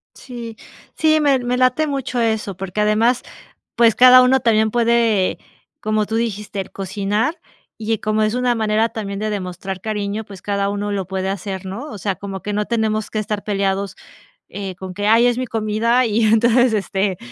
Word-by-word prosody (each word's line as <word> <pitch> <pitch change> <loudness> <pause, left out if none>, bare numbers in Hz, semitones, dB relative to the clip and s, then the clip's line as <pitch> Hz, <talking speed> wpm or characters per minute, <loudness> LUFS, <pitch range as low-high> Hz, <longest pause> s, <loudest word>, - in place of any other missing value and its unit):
Sí, 235 -3 -9 0.4
sí, 310 -1 +3
me 285 -3 +3
me 245 0 -1
late 255 +5 +2
mucho 270 -3 -2
eso, 220 -3 -1
porque 195 +2 -3
además, 220 +4 +2 0.5
pues, 230 -2 +5
cada 255 0 +8
uno 265 +1 +4
también 220 -2 +2
puede, 230 -4 +2 0.4
como 215 0 0
tú 220 - -2
dijiste, 210 -3 -3
cocinar, 205 - -2 0.4
y, 220 0 -3
eh, 220 - -6
como 215 0 0
es 215 +2 +1
una 250 -1 +1
manera 220 0 +1
también 200 -3 -5
de 215 +1 -2
demostrar 190 -1 -5
cariño, 210 +1 -3
pues, 195 -2 -12
cada 200 -1 -1
uno 205 0 -3
lo 195 -2 -2
puede 190 0 -3
hacer, 195 -1 -4
¿no? 205 +10 -6
O 210 - -8
sea, 195 0 -1
como 195 +1 -7
que 210 - -4
no 210 +1 0
tenemos 220 -1 -1
que 215 - -3
estar 210 -1 -3
peleados, 195 -1 -1 0.5
eh, 195 -2 -6
con 185 +1 -8
que: 205 +2 -2
"Ay, 230 +3 +5
es 245 0 +1
mi 255 - -1
comida, 225 +3 +1
y 225 0 +1
entonces, 235 +2 +4
este, 195 -2 -1
215 Hz, 185 wpm, -20 LUFS, 200-235 Hz, 0.5 s, cada